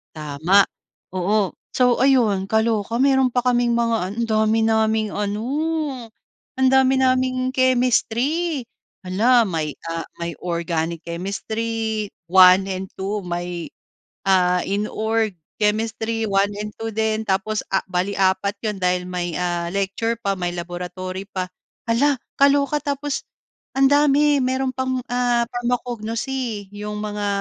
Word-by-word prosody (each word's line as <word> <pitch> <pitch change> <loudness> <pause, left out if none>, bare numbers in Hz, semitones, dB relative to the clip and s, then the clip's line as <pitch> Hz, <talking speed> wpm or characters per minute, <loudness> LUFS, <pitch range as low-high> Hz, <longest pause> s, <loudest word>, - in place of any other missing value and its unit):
Tama, 155 +6 +3 0.5
oo. 190 +1 +1 0.2
So, 250 -2 +3
ayun, 225 -8 +3
kaloka. 220 0 +1
Meron 265 -1 +4
pa 245 0 0
kaming 240 -1 +2
mga 225 -5 0
andami 220 -1 +2
naming 220 -1 +2
ano, 210 +1 -2 1.1
andami 265 0 +4
naming 255 0 +1
Chemistry. 255 +4 +1 0.4
Hala, 230 +6 +4
may, 160 -5 -3
ah, 165 0 -3 0.2
may 170 0 -3
Organic 170 -1 -2
Chemistry 220 +4 -3 0.2
1 185 +1 +7
and 190 0 -4
2, 200 +2 -2
may, 175 -1 -4 0.6
ah, 180 -2 +3
Inorg 215 +1 -1 0.2
Chemistry 220 +1 0
1 200 0 +2
and 210 0 -5
2, 225 0 -3
din, 220 0 0
tapos, 195 +3 0
ah, 195 - +1
bale 185 +2 -1
4 195 +1 +1
‘yon 210 -3 -2
dahil 180 0 +1
may, 180 -2 -3
ah, 175 -1 -1
lecture 200 +4 -1
pa, 200 -3 -1
may 180 -2 -2
laboratory 185 +2 -6
pa. 185 -3 -3 0.4
Hala, 270 +5 +3 0.2
kaloka. 280 +1 +4
Tapos 285 -1 -2 0.6
andami, 285 +1 +4
mayroon 260 0 0
pang, 260 0 -1 0.2
ah, 245 -1 +2
Pharmacognosy, 240 -2 -3
yung 210 0 -5
mga 210 -1 -3
215 Hz, 120 wpm, -22 LUFS, 190-245 Hz, 1.1 s, 1